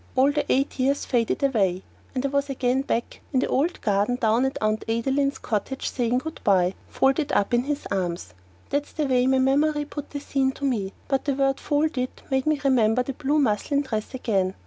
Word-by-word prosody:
All 265 +2 +4
the 290 -1 -1
eight 275 +1 +1
years 275 +2 +1
faded 240 +2 0
away, 195 -9 +1 0.3
and 255 +1 -1
I - - +1
was 280 +1 0
again 260 -1 +1
back 235 -3 -3
in 260 - +3
the - - +1
old 310 +7 0
garden 205 +2 +1
down 235 +1 +2
at 265 - -2
Aunt 215 0 0
Adeline's 270 +5 +1
cottage 230 +4 -3
saying 245 -1 0
good 320 +5 -5
bye, 185 -2 +3
folded 270 +2 +1
up 200 - +1
in 240 +1 +2
his 290 0 -3
arms. 175 - -2 0.4
That's 285 +1 -1
the 305 - -1
way 255 -2 +2
my 265 0 +3
memory 295 +3 +2
put 290 0 -7
the 285 - -5
scene 270 -1 0
to 280 - -5
me, 210 -8 -1
but 270 -1 0
the 280 -2 +1
word 270 0 +1
"folded" 290 -4 0 0.2
made 265 +1 +1
me 305 -2 +2
remember 250 -3 +3
that 270 +2 -6
blue 295 +1 +1
muslin 280 +2 +1
dress 220 -2 -4
again. 195 -7 0
265 Hz, 205 wpm, -25 LUFS, 225-280 Hz, 0.4 s, All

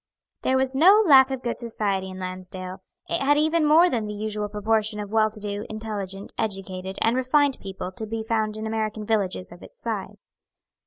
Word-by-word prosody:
There 260 - +2
was 265 0 +1
no 380 +10 +6
lack 270 -5 +7
of 265 -1 -4
good 235 - -2
society 205 -5 -2
in 185 - -8
Lansdale. 185 0 -7 0.3
It - - -1
had 290 +2 +3
even 315 +2 +2
more 325 +4 +6
than 230 -9 -1
the 210 - -5
usual 210 0 -3
proportion 215 +1 0
of 205 -1 -6
well 215 -1 +3
to 215 0 -8
do, 205 0 -3
intelligent, 205 -3 -6
educated, 190 -2 -3
and 225 +2 +3
refined 270 +2 +2
people 190 -1 -6
to 220 +3 -5
be 225 +1 -3
found 220 -1 -1
in 215 - -5
American 220 -1 -2
villages 200 -4 -1
of 175 - -13
its - - -14
size. - - -6
215 Hz, 195 wpm, -25 LUFS, 200-255 Hz, 0.3 s, lack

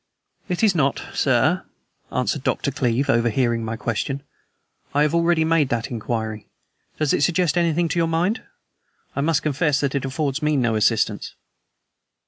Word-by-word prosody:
"It 180 +4 -1
is 210 -3 +5
not, 140 -5 +1
sir," - - +2 0.5
answered - - -1
Dr. - - 0
Cleeve, 125 +3 0
overhearing 115 0 +1
my 110 0 -3
question. 125 +5 -3 0.7
"I 145 - +4
have 150 - +1
already 170 -1 +3
made 160 -4 +2
that 120 +3 -2
inquiry. 110 -2 -3 0.5
Does 155 -2 +1
it - - +1
suggest 175 -1 +2
anything 170 -1 +2
to 170 - 0
your 165 - +2
mind? 175 +8 0 0.7
I 140 - 0
must 155 0 +1
confess 150 -1 +1
that 140 -2 -1
it 140 - -1
affords 135 +2 -2
me 150 -1 +1
no 120 -3 +1
assistance." 110 +1 +1
140 Hz, 155 wpm, -22 LUFS, 120-165 Hz, 0.7 s, is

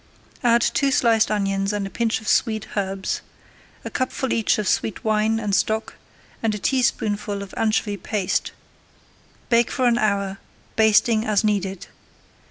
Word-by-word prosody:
Add 235 -1 +4
two 280 - +2
sliced 230 -4 +3
onions 195 -1 0
and 205 -1 -2
a 195 - -7
pinch 230 -1 -1
of 215 - -11
sweet 220 -2 +1
herbs, 195 -1 -2 0.6
a - - -5
cupful 255 0 -1
each 225 - +2
of 210 -2 -2
sweet 215 - -1
wine 220 0 +1
and 210 -3 -2
stock, 220 +3 0 0.5
and 220 -2 0
a - - -3
teaspoonful 210 -4 0
of 195 - -12
anchovy 215 -2 0
paste. 200 0 -1 1.0
Bake 235 -1 +3
for 255 - -1
an 240 -1 +3
hour, 200 -2 0 0.4
basting 220 0 +4
as 215 -3 +1
needed. 195 -3 -1
215 Hz, 150 wpm, -22 LUFS, 200-230 Hz, 1.0 s, Add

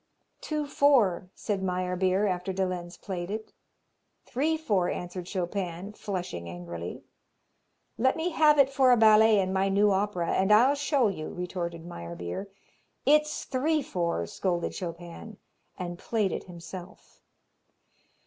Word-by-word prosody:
"Two 305 -1 -2
four," 255 -12 +3
said 205 -3 -2
Meyerbeer, 185 +1 +1
after 185 -1 -1
de 190 0 0
Lenz 175 -1 -5
played 180 -3 -5
it. 215 +1 -5 0.7
"Three 305 +6 0
four," 205 - +1
answered 180 0 -5
Chopin, 185 0 -3
flushing 175 - -5
angrily. 85 0 -7 1.0
"Let 260 +3 +3
me 335 +2 -1
have 305 -2 +5
it 275 -1 +5
for 265 -2 +4
a 245 - +6
ballet 220 0 +6
in 190 -1 0
my 195 +1 +2
new 205 +1 +4
opera 190 -3 0
and 190 +2 +2
I'll 240 +6 +6
show 285 -3 +2
you," 180 -6 -4
retorted 175 -2 -5
Meyerbeer. 85 - -6 0.6
"It's 300 +1 +3
three 295 +3 0
four," 170 - -1
scolded 175 - -2
Chopin, 175 +4 -7 0.4
and 175 -1 -5
played 215 -4 0
it - - -4
himself. 175 +1 -11
190 Hz, 135 wpm, -28 LUFS, 175-225 Hz, 1.0 s, a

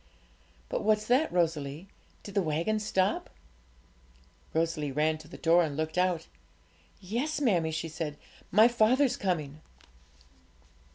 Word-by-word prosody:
But - - -2
what's 215 0 +2
that, 260 +7 +2
Rosalie? 160 -1 -1 0.4
did 200 - -9
the 200 - +2
waggons 170 +7 -1
stop?' 190 -2 0 1.2
Rosalie 160 -3 -1
ran 155 +3 +1
to 155 - -13
the - - -11
door 170 +1 +4
and 145 -3 -3
looked 155 0 -2
out. 180 -3 +1 0.7
'Yes, 240 +12 -2
mammie,' 185 - +2
she 160 +1 -3
said; 155 -2 -5 0.3
'my 215 +5 +6
father's 245 +3 +3
coming.' 155 -6 -2
175 Hz, 125 wpm, -29 LUFS, 155-215 Hz, 1.2 s, my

